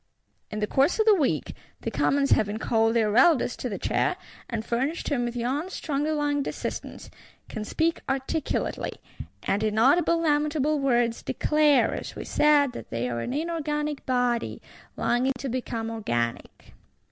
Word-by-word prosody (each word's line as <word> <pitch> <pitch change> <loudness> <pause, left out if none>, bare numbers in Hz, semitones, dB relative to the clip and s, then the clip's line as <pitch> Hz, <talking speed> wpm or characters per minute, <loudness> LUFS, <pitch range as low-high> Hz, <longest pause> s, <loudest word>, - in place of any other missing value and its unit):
In 215 - -5
the - - +2
course 275 +8 +2
of 440 - +4
the 435 - +7
week, 310 -9 0 0.3
the - - -3
Commons 275 0 +1
having 210 0 +2
called 225 0 +1
their 215 -2 +2
Eldest 265 -1 +4
to 250 - -3
the 200 - -4
chair, - - 0 0.3
and 225 -2 -3
furnished 270 +9 -1
him 255 -5 0
with 240 0 -4
young 265 +9 -2
stronger 300 -3 -2
lunged 290 -1 0
assistants,—can 215 -1 -7
speak 330 +7 0
articulately; 270 +3 -2 0.5
and, 200 - 0
in 215 0 0
audible 335 +8 +4
lamentable 300 -1 +1
words, 240 -4 +1
declare, 295 -5 +2
as - - -6
we - - -6
said, 295 -3 +4
that - - -9
they 115 +2 -2
are 120 -1 -3
an 180 - -3
inorganic 300 -1 -2
body, 245 -2 0 0.4
longing 255 +3 +1
to 270 - -5
become 230 -2 -3
organic. 120 - -3
265 Hz, 155 wpm, -26 LUFS, 230-300 Hz, 0.5 s, the